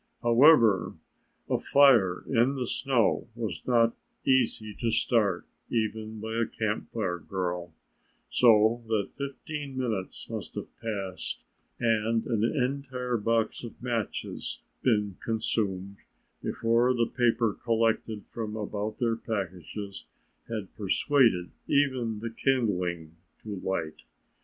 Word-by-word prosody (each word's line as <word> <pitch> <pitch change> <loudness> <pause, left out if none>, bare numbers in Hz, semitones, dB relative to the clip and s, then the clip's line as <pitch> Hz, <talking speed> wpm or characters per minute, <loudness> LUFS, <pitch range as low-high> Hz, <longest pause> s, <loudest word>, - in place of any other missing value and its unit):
However, 120 - +6 0.5
a - - +1
fire 120 -11 +5
in 130 +2 +3
the 130 -2 -2
snow 120 -3 +1
was 115 -5 -4
not 115 -2 +4 0.3
easy 115 -5 +2
to 115 - +1
start 105 -5 +2 0.2
even 110 -1 -2
by 110 +1 -4
a 115 - +1
Camp 110 -1 -2
Fire 95 -6 -2
girl, 90 -2 -3 0.6
so 115 0 +5
that 110 -3 0
fifteen 140 0 -5
minutes 110 -7 -3
must - - -6
have - - -7
passed 100 -5 -4 0.3
and 115 -1 +1
an 115 -3 0
entire 125 -1 -1
box 115 +1 0
of 120 - -9
matches 120 -4 -3 0.2
been 105 -6 +1
consumed 100 -4 -1 0.4
before 120 +2 +2
the 120 -1 +2
paper 115 -2 +2
collected 115 -2 0
from 110 -2 -4
about 105 0 -3
their 115 -2 +1
packages 100 -2 -5 0.4
had 110 -4 -5
persuaded 105 - +2 0.2
even 125 -6 +1
the 115 0 -4
kindling 90 - 0 0.3
to 105 -2 -5
light. 85 -4 -3
115 Hz, 115 wpm, -28 LUFS, 100-120 Hz, 0.6 s, However